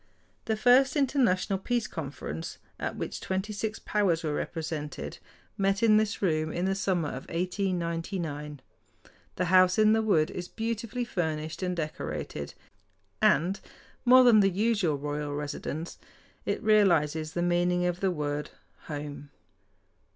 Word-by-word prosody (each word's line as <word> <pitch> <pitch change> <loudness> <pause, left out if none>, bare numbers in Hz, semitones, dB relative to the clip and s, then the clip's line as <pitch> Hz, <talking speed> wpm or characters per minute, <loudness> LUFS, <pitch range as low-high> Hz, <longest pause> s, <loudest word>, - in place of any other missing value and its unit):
The 220 - 0
first 255 +3 +5
International 245 -9 +2
Peace 240 +2 -1
Conference, 135 - -6 0.2
at - - -3
which - - -5
twenty 190 +3 -2
six 215 +1 -3
powers 190 -6 0
were 155 -2 -1
represented, 155 -2 -4 0.4
met 195 +2 +1
in 215 -2 +6
this 215 -1 0
room 155 -3 +1
in 175 +3 -1
the 190 - +1
summer 185 -5 0
of - - -7
1899. 170 -5 -2 0.7
The 180 - 0
House 185 0 +5
in 215 0 +5
the 220 - +3
Wood 170 -7 +2
is 180 -1 -5
beautifully 230 +2 -3
furnished 160 -6 -3
and 180 -1 -1
decorated, 155 -3 -4 0.7
and, 180 +7 +3 0.4
more 255 +1 +8
than 235 -3 +7
the 195 -1 +5
usual 200 -5 +1
royal 145 0 -3
residence, 150 +2 -5 0.5
it - - -1
realizes 160 -8 +3
the 175 - -1
meaning 175 0 +2
of 175 0 -1
the 195 - +1
word 150 -3 -2 0.4
"home." 145 -1 -6
180 Hz, 135 wpm, -28 LUFS, 155-210 Hz, 0.7 s, more